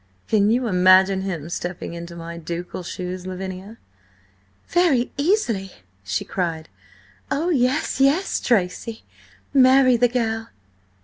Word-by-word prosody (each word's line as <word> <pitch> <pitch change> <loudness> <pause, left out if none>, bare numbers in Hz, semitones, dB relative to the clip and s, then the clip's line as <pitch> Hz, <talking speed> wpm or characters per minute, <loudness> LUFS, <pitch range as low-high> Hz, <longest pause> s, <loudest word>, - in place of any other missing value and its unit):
"Can 210 -1 +3
you 245 +3 +1
imagine 190 -1 +4
him 175 -6 -4
stepping 175 -1 -5
into 170 0 -8
my 170 0 -7
ducal 170 +2 -6
shoes, 180 +1 -6
Lavinia?" 190 +3 -7 0.9
"Very 325 -9 +2
easily!" 265 - 0 0.3
she 95 - -2
cried. 165 -4 -3 0.6
"Oh, 310 +5 0
yes, 270 -1 +1
yes, 295 +8 +2
Tracy! 220 +1 -1 0.5
Marry 260 -2 +5
the 245 +1 +4
girl!" 225 -2 -2
200 Hz, 115 wpm, -22 LUFS, 180-255 Hz, 0.9 s, Marry